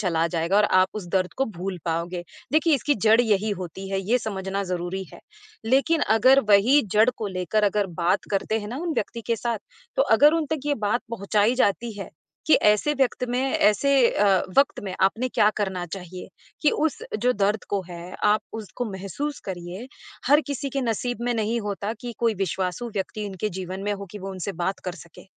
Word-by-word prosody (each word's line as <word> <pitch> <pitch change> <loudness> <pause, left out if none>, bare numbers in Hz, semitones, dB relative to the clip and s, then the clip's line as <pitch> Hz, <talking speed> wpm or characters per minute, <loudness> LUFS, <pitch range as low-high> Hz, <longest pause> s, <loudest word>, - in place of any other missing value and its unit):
चला 165 -4 +1
जाएगा 170 +3 0
और 210 - +5
आप 185 -1 +4
उस 205 -4 -5
दर्द 185 -2 0
को 270 - +2
भूल 185 -3 -5
पाओगे, 170 +1 -2 0.3
देखिए 315 0 +4
इसकी 285 +3 +1
जड़ 220 +2 +4
यही 215 -2 +1
होती 190 +3 -7
है, 195 - 0
ये 225 +6 +1
समझना 195 -2 -3
ज़रूरी 180 +1 -3
है, - - -12 0.4
लेकिन 275 +7 +2 0.2
अगर 265 +4 +6
वही 225 +9 +6
जड़ 215 +3 +5
को 220 - -3
लेकर 210 +4 +1
अगर 205 0 +1 0.2
बात 185 +4 +2
करते 210 +2 0
हैं 210 -1 -6
उन 340 -1 -2
व्यक्ति 230 +3 -3
के 230 -1 +1
साथ, 235 -1 -2 0.4
तो - - +5
अगर 295 -8 +5
उन 320 -2 0
तक 295 -2 -2
ये 290 - +2
बात 240 +4 +1
पहुँचाई 210 +2 +1
जाती 225 +3 -1
है, 195 - -7 0.4
कि 315 - +6
ऐसे 210 +8 +3
व्यक्त 260 -2 +1
में 245 - 0
ऐसे 265 0 +2 0.2
अ, 195 -2 +3 0.2
वक़्त 280 - +3
में 185 -1 -4
आपने 225 +6 +2
क्या 210 - +3
करना 190 -4 -2
चाहिए? 180 -1 -8 0.4
कि 295 - +5
उस 310 -1 0 0.2
जो 250 +1 +3
दर्द 205 0 0
को 200 -1 0
है, 175 +1 -8
आप 210 +1 +4
उसको 225 +3 -5
महसूस 195 - -4
करिए, 185 +4 -6 0.4
हर 290 +3 +6
किसी 280 0 -3
के 275 - -1
नसीब 245 +1 -2
में 245 - +1
नहीं 225 +1 0
होता 205 +1 -3
कि 240 -1 -5
कोई 230 -2 +2
विश्वासू 190 +3 -2
व्यक्ति 210 +2 -3
उनके 195 +2 -3
जीवन 185 0 -6
में 205 0 -1
हो 200 0 -6
कि 210 - -8
वो 195 0 -6
उनसे 190 +1 -4
बात 175 +3 -2
कर 180 - -3
सके, 170 -3 -14
210 Hz, 200 wpm, -24 LUFS, 190-245 Hz, 0.4 s, अगर